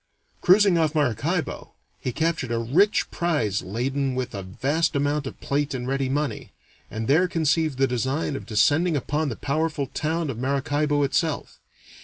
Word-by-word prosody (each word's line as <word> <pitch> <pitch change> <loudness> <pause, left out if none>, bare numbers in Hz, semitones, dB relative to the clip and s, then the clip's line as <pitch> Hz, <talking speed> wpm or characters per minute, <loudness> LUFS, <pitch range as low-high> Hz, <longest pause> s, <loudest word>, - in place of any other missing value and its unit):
Cruising 190 -1 +5
off 160 -1 +1
Maracaibo, 145 - -1 0.3
he 130 - -3
captured 160 -2 -1
a 115 - 0
rich 155 - +2
prize 135 - 0
laden 130 +6 -2
with 130 -1 -3
a 100 - -4
vast 140 - -1
amount 145 0 0
of - - -8
plate 140 0 -1
and 125 -1 -4
ready 135 0 0
money, 140 -4 -2 0.4
and 110 0 -4
there 160 +7 +4
conceived 160 -4 +1
the 135 - +4
design 130 +4 -1
of - - -7
descending 145 +9 +3
upon 150 +3 -1
the 115 - -4
powerful 155 +2 -1
town 155 +3 -2
of 115 - -7
Maracaibo 145 +2 0
itself. 150 +2 -1
145 Hz, 160 wpm, -24 LUFS, 130-160 Hz, 0.4 s, Cruising